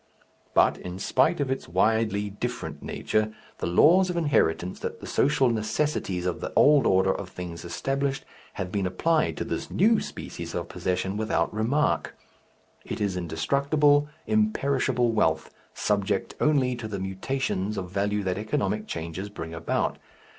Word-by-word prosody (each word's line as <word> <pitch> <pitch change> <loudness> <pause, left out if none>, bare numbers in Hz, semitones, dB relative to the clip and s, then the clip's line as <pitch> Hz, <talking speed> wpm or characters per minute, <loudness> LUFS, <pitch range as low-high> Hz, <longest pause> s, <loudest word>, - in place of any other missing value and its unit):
But, - - +4
in 90 0 -6
spite 130 - +2
of 140 -2 0
its 135 - -3
widely 105 +2 +1
different 100 - -5
nature, 110 0 -1 0.3
the - - -2
laws 175 - +5
of 175 - -2
inheritance 90 - +1
that - - -5
the - - -9
social 135 -1 +2
necessities 110 -4 -1
of 90 - -2
the - - -4
old 145 -1 +6
order 95 0 +4
of 95 - -6
things 85 -2 -7
established 135 +10 -2 0.3
have 90 - -4
been 100 -2 0
applied 155 - +1
to - - -1
this - - -4
new 215 +4 +4
species - - -7
of - - -3
possession 95 +2 -2
without 110 0 0
remark. 120 +8 0 0.7
It - - -5
is 100 -3 0
indestructible, 140 - +2 0.2
imperishable 140 - +1
wealth, 80 -8 +1 0.2
subject 100 -1 0
only 135 -5 +3
to 115 -2 -5
the 105 -2 -4
mutations 95 +1 -2
of 90 -2 -4
value 100 +1 0
that 95 0 -1
economic 105 0 -1
changes 85 +5 -5
bring 80 -5 -7
about. 80 0 -1
105 Hz, 150 wpm, -26 LUFS, 95-135 Hz, 0.7 s, old